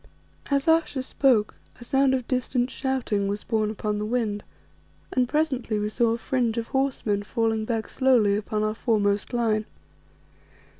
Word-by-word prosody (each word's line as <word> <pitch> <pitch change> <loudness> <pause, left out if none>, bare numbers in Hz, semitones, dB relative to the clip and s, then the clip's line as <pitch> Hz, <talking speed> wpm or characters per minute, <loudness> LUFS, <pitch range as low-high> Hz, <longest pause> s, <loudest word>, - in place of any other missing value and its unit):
As 280 0 +1
Ayesha 320 -5 +2
spoke 250 -6 +2 0.3
a - - -9
sound 270 +2 +2
of 255 -3 -4
distant 250 0 0
shouting 240 -7 -1
was 205 +1 -3
borne 215 -2 0
upon 210 -1 -2
the 210 - -2
wind, 215 -3 -1 0.7
and 250 -1 +1
presently 265 -8 0
we 210 0 -1
saw 235 +1 +1
a - - -2
fringe 235 -1 -1
of 230 0 -3
horsemen 265 -7 0
falling 225 0 -1
back 225 -1 -2
slowly 240 -6 +3
upon 210 +1 -2
our 215 0 0
foremost 205 -3 0
line. 220 -3 +1
230 Hz, 155 wpm, -25 LUFS, 215-260 Hz, 0.7 s, slowly